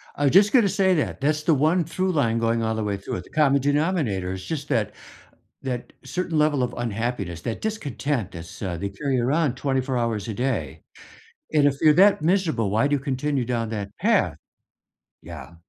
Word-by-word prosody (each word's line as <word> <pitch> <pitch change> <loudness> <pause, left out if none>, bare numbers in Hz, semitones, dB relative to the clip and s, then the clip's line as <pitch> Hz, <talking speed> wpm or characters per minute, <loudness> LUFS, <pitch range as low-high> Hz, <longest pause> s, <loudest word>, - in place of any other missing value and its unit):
I 145 - -2
was 140 - +4
just 200 +3 +6
gonna 235 -7 +5
say 190 -1 +2
that, 150 -3 -2
that's 150 +2 +1
the 160 - +3
one 155 +5 +2
true 185 +4 -1
line 115 -9 +1
going 115 0 +1
all 110 0 0
the 110 - -2
way 100 -1 -1
through 95 - -5
it, 90 - -7
the - - -18
common 140 -3 +3
denominator 145 - 0
is 95 0 -7
just 150 -3 -4
that 115 -7 0 0.7
that 125 -2 -4
certain 180 -3 -2
level 150 -3 +2
of 125 0 -2
unhappiness, 115 -6 -3
that 115 - -4
discontent 145 - -3
that's 85 -1 -10
uh, 90 -3 -2
they 100 +4 -3
carry 130 +6 -2
around 140 +2 +1
24 130 -1 -1
hours 115 -3 -2
a 110 - -3
day, 130 +5 -2 0.7
and 150 -2 +4
if 140 -1 +2
you're 155 -1 +6
that 195 -1 +5
miserable, 160 - +1
why 110 +7 +2
do 145 0 +2
you - - -5
continue 135 0 -1
down 115 -2 -2
that 100 -3 -4
path? - - +2 0.9
Yeah, 80 -2 -10
135 Hz, 200 wpm, -24 LUFS, 110-155 Hz, 0.9 s, just